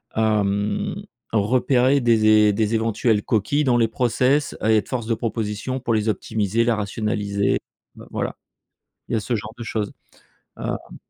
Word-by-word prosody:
hem, 105 Hz, -2 st, 0 dB, 0.4 s
repérer 125 Hz, +5 st, +3 dB
des 115 Hz, -3 st, +3 dB, 0.2 s
é 105 Hz, -, +3 dB
des 110 Hz, +1 st, 0 dB
éventuelles 110 Hz, -1 st, +1 dB
coquilles 115 Hz, +8 st, +1 dB
dans 120 Hz, -2 st, +3 dB
les 115 Hz, -1 st, +3 dB
process, 125 Hz, +5 st, +1 dB
et 110 Hz, 0 st, +4 dB
être -, -, -1 dB
force 120 Hz, -4 st, -3 dB
de 115 Hz, -, +1 dB
proposition 115 Hz, +3 st, -3 dB
pour 120 Hz, -2 st, -1 dB
les 110 Hz, 0 st, 0 dB
optimiser, 110 Hz, +1 st, 0 dB
la 120 Hz, -1 st, +2 dB
rationaliser 105 Hz, -1 st, -1 dB, 0.5 s
voilà, -, -, -3 dB, 0.7 s
il -, -, -3 dB
y -, -, +3 dB
a -, -, +2 dB
ce 115 Hz, +3 st, -2 dB
genre 110 Hz, 0 st, -5 dB
de 120 Hz, -, -6 dB
choses, 105 Hz, -2 st, -3 dB, 0.7 s
heu -, -, -5 dB
110 Hz, 155 wpm, -22 LUFS, 105-120 Hz, 0.7 s, et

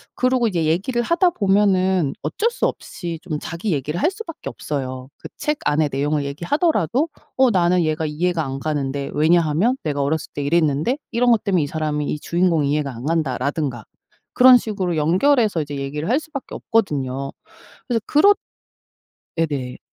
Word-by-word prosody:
그러고 255 Hz, -2 st, +2 dB
이제 170 Hz, -4 st, -1 dB
얘기를 195 Hz, +10 st, 0 dB
하다 340 Hz, +8 st, +3 dB
보면은 190 Hz, -, +2 dB
어쩔 420 Hz, -, 0 dB
수 475 Hz, -, -1 dB
없이 170 Hz, -2 st, -4 dB
좀 155 Hz, -5 st, -3 dB
자기 170 Hz, +7 st, -4 dB
얘기를 150 Hz, +3 st, -2 dB
할 345 Hz, -, +3 dB
수밖에 385 Hz, -6 st, -7 dB
없어요. 130 Hz, -3 st, -5 dB
그 -, -, -10 dB
책 300 Hz, 0 st, 0 dB
안에 150 Hz, +1 st, +2 dB
내용을 145 Hz, +2 st, -1 dB
얘기하더라도 245 Hz, -, 0 dB, 0.3 s
"어 260 Hz, -1 st, +5 dB
나는 180 Hz, -3 st, +3 dB
얘가 155 Hz, 0 st, -1 dB
이해가 165 Hz, +2 st, -1 dB
안 135 Hz, 0 st, -4 dB
가는데 140 Hz, -2 st, -2 dB
왜냐하면 165 Hz, -, +2 dB
내가 145 Hz, -2 st, -1 dB
어렸을 145 Hz, +2 st, -1 dB
때 145 Hz, -, -3 dB
이랬는데 155 Hz, -, +1 dB
이런 240 Hz, +1 st, +3 dB
것 220 Hz, -2 st, +2 dB
때문에 185 Hz, -6 st, +2 dB
이 145 Hz, -, -2 dB
사람이 150 Hz, -1 st, -2 dB
이 150 Hz, -, -2 dB
주인공이 170 Hz, -3 st, +1 dB
이해가 145 Hz, -3 st, -1 dB
안 120 Hz, +4 st, -8 dB
간다."라든가 145 Hz, -5 st, -1 dB, 0.5 s
그런 255 Hz, 0 st, +8 dB
식으로 195 Hz, -7 st, -2 dB
연결해서 190 Hz, -, +3 dB
이제 145 Hz, -1 st, -5 dB
얘기를 145 Hz, +5 st, -4 dB
할 255 Hz, +5 st, +3 dB
수밖에 310 Hz, -4 st, -8 dB
없거든요. 140 Hz, -, -1 dB, 0.6 s
그래서 235 Hz, -3 st, +1 dB
그렇 390 Hz, +8 st, +6 dB, 1.0 s
네네. 140 Hz, -6 st, -2 dB
165 Hz, 370 characters per minute, -21 LUFS, 145-225 Hz, 1.0 s, 그런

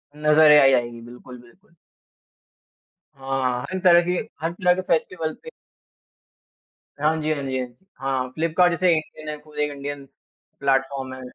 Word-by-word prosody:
नज़र 150 Hz, 0 st, +5 dB
ए 150 Hz, -, +8 dB, 0.2 s
अ, -, -, +7 dB
आएगी। 120 Hz, -1 st, -3 dB
बिल्कुल, 125 Hz, +1 st, -12 dB
बिल्कुल। 170 Hz, +8 st, -23 dB, 1.4 s
हाँ, 135 Hz, -2 st, -2 dB
हर 185 Hz, -, -2 dB
तरह 175 Hz, -2 st, +6 dB
के 180 Hz, -, -1 dB, 0.3 s
हर 165 Hz, +1 st, -1 dB
तरह 180 Hz, 0 st, +2 dB
के 185 Hz, -, -3 dB
फ़ेस्टिवल 165 Hz, -2 st, -1 dB
पे 480 Hz, -, -9 dB, 1.5 s
हाँ 155 Hz, +2 st, +2 dB
जी, 155 Hz, +1 st, -1 dB
हाँ 145 Hz, -2 st, -5 dB
जी, 130 Hz, -1 st, -2 dB
हाँ 125 Hz, -, -3 dB
जी। 125 Hz, +10 st, -27 dB
हाँ। 135 Hz, -1 st, -2 dB
फ्लिपकार्ट 165 Hz, +4 st, +2 dB
जैसे 180 Hz, +1 st, +2 dB
इंडियन 155 Hz, -1 st, -5 dB
है, 150 Hz, -, -5 dB
कोई 150 Hz, 0 st, -5 dB
इंडियन 140 Hz, 0 st, -7 dB, 0.5 s
प्लेटफ़ॉर्म 135 Hz, -1 st, -1 dB
है। 130 Hz, -, -9 dB
150 Hz, 160 wpm, -23 LUFS, 130-165 Hz, 1.5 s, ए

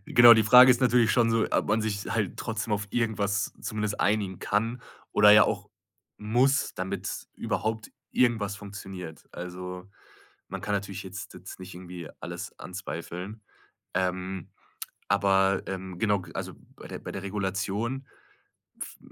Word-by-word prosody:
Genau, 120 Hz, -1 st, +10 dB
die 110 Hz, -1 st, +6 dB
Frage 125 Hz, +4 st, +9 dB
ist 125 Hz, +1 st, +3 dB
natürlich 120 Hz, -2 st, +4 dB
schon 115 Hz, -2 st, +3 dB
so, 115 Hz, -1 st, +3 dB
ob -, -, +1 dB
man 110 Hz, +2 st, +2 dB
sich 100 Hz, -2 st, -2 dB
halt 105 Hz, -5 st, -1 dB
trotzdem 110 Hz, -1 st, -3 dB
auf 105 Hz, 0 st, -1 dB
irgendwas 105 Hz, -4 st, 0 dB
zumindest 105 Hz, -1 st, -2 dB
einigen 100 Hz, -3 st, +1 dB
kann 115 Hz, +4 st, -1 dB, 0.3 s
oder 105 Hz, 0 st, +7 dB
ja 105 Hz, -1 st, +9 dB
auch -, -, -1 dB, 0.5 s
muss, 125 Hz, +6 st, +2 dB
damit 95 Hz, 0 st, -4 dB
überhaupt 110 Hz, 0 st, -2 dB, 0.2 s
irgendwas 110 Hz, -5 st, +2 dB
funktioniert. 95 Hz, -5 st, -8 dB
Also, 90 Hz, +1 st, -6 dB, 0.6 s
man -, -, -6 dB
kann 105 Hz, -, -1 dB
natürlich 100 Hz, -1 st, -3 dB
jetzt 95 Hz, 0 st, -8 dB
jetzt -, -, -10 dB
nicht 95 Hz, 0 st, -9 dB
irgendwie 90 Hz, -2 st, -8 dB
alles -, -, -7 dB
anzweifeln, 90 Hz, +3 st, -6 dB, 0.5 s
ähm, 95 Hz, 0 st, -2 dB, 0.6 s
aber, 95 Hz, -1 st, +3 dB
ähm, 95 Hz, -2 st, -5 dB
genau, 105 Hz, -3 st, +2 dB
g 85 Hz, -3 st, -12 dB
also -, -, -4 dB, 0.2 s
bei -, -, -11 dB
der -, -, -7 dB
bei -, -, -7 dB
der 100 Hz, 0 st, -6 dB
Regulation, 100 Hz, +6 st, -2 dB, 0.7 s
v -, -, -7 dB
100 Hz, 150 wpm, -28 LUFS, 95-110 Hz, 0.7 s, Genau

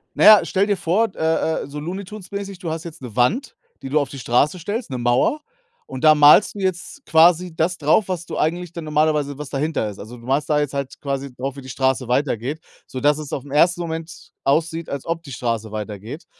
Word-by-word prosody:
Naja, 215 Hz, -1 st, +8 dB
stell 195 Hz, +1 st, +1 dB
dir 205 Hz, -2 st, +1 dB
vor 185 Hz, +7 st, +1 dB
d -, -, -22 dB
äh 160 Hz, 0 st, 0 dB
äh, -, -, -8 dB
so 145 Hz, +1 st, -7 dB
Looney 180 Hz, +6 st, -5 dB
Tunes 190 Hz, -1 st, -11 dB
mäßig, 200 Hz, -2 st, -5 dB
du 170 Hz, -5 st, -4 dB
hast 160 Hz, 0 st, -4 dB
jetzt 170 Hz, -3 st, -10 dB
'ne 120 Hz, -4 st, -9 dB
Wand, 195 Hz, -, +1 dB, 0.3 s
die 135 Hz, -, -6 dB
du 150 Hz, -, +2 dB
auf 140 Hz, -3 st, -2 dB
die 135 Hz, -, -8 dB
Straße 135 Hz, +8 st, +1 dB
stellst, 205 Hz, -, -4 dB
'ne 130 Hz, -, -4 dB
Mauer. 120 Hz, -, +1 dB, 0.5 s
Und 130 Hz, -, -7 dB
da 155 Hz, -1 st, +7 dB
malst 150 Hz, +9 st, +6 dB
du -, -, -6 dB
jetzt 190 Hz, +8 st, -3 dB
quasi 170 Hz, +1 st, +4 dB
das 170 Hz, +2 st, 0 dB
drauf, 160 Hz, +7 st, +2 dB
was 175 Hz, -2 st, -3 dB
du -, -, -6 dB
eigentlich 175 Hz, +2 st, -1 dB
dann 170 Hz, -, -6 dB
normalerweise 150 Hz, -2 st, +1 dB
was 150 Hz, 0 st, -6 dB
dahinter 140 Hz, -5 st, -1 dB
ist. 100 Hz, -, -10 dB
Also, 115 Hz, +4 st, -9 dB
du 115 Hz, -, -14 dB
malst 140 Hz, +3 st, 0 dB
da 150 Hz, -1 st, +3 dB
jetzt 145 Hz, -2 st, -2 dB
halt 140 Hz, -1 st, -4 dB
quasi 140 Hz, -2 st, -4 dB
drauf, 130 Hz, +2 st, -5 dB
wie 140 Hz, -, -9 dB
die 130 Hz, -, -11 dB
Straße 130 Hz, -1 st, 0 dB
weitergeht, 130 Hz, +2 st, -1 dB, 0.3 s
sodass 145 Hz, +3 st, +1 dB
es 150 Hz, -2 st, -7 dB
auf 135 Hz, -, -3 dB
den 140 Hz, -, -12 dB
1. 170 Hz, +4 st, +4 dB
Moment 160 Hz, -1 st, -6 dB
aussieht, 165 Hz, +3 st, 0 dB
als 140 Hz, -2 st, -5 dB
ob 165 Hz, 0 st, -3 dB
die 140 Hz, -, -10 dB
Straße 115 Hz, -3 st, -3 dB
weitergeht. 110 Hz, -, -6 dB
150 Hz, 235 wpm, -21 LUFS, 135-175 Hz, 0.5 s, Naja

